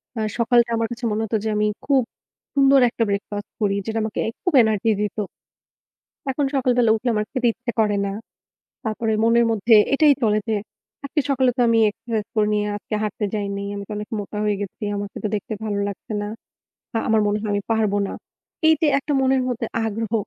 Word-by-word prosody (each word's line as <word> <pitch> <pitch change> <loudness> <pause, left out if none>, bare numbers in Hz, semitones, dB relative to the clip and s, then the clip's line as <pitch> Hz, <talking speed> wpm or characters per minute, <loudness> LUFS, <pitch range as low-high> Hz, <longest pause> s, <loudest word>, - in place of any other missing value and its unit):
অ্যা 220 - -2 0.2
সকালটা 235 0 +3
আমার 225 0 0
কাছে 240 0 -5
মনে 215 +1 0
হতো 220 +1 0
যে 220 - -1
আমি 210 0 +2 0.2
খুব 270 -3 +3 0.5
সুন্দর 275 0 +6
একটা 230 - -1
breakfast 205 +1 -3
করি, 200 -1 +2
যেটা 225 0 -1
আমাকে 220 - -3 0.2
খুব 360 -4 0
energy 220 0 +1
দিত। 210 0 -2 1.1
এখন 280 +2 0
সকালবেলা 250 -3 +3
উঠলে 240 +3 -2
আমার 210 0 0
খেতে 255 -3 +1
ইচ্ছে 245 -1 -5
করে 210 -2 +3
না। 200 - -2 0.7
তারপরে 220 0 -1
মনের 235 +1 +4
মধ্যে 225 +2 +3 0.2
এটাই 290 +1 +6
চলে 215 -1 +3
যে 220 - +2 0.5
আজকে 290 +2 0
সকালে 260 -2 +3
তো - - +2
আমি 230 0 +4
exercise 225 0 -4
করিনি, 210 -1 +2
আর - - -2
আজকে 215 - -5
হাঁটতে 210 0 -2
যাইনি। 200 -1 -3
আমি 200 - -5
তো - - -10
অনেক 210 0 -6
মোটা 205 +1 -6
হয়ে 210 -1 +1
গেছি, 205 +2 -6
আমাকে 200 0 -5
তো 215 - +1
দেখতে 210 +2 -4
ভালো 205 -2 -2
লাগছে 200 +2 -7
না। - - -3 0.7
আ - - +3
আমার 220 -1 +4
মনে 205 +1 +1
হয় 215 - -3
আমি 205 - -1
পারব 220 -2 +1
না। - - -6 0.6
এইযে 315 0 +4
এত 280 - -12
মনের 265 0 +3
মধ্যে 235 -2 -2 0.2
আগ্রহ, 225 0 -3
220 Hz, 195 wpm, -22 LUFS, 210-245 Hz, 1.1 s, সুন্দর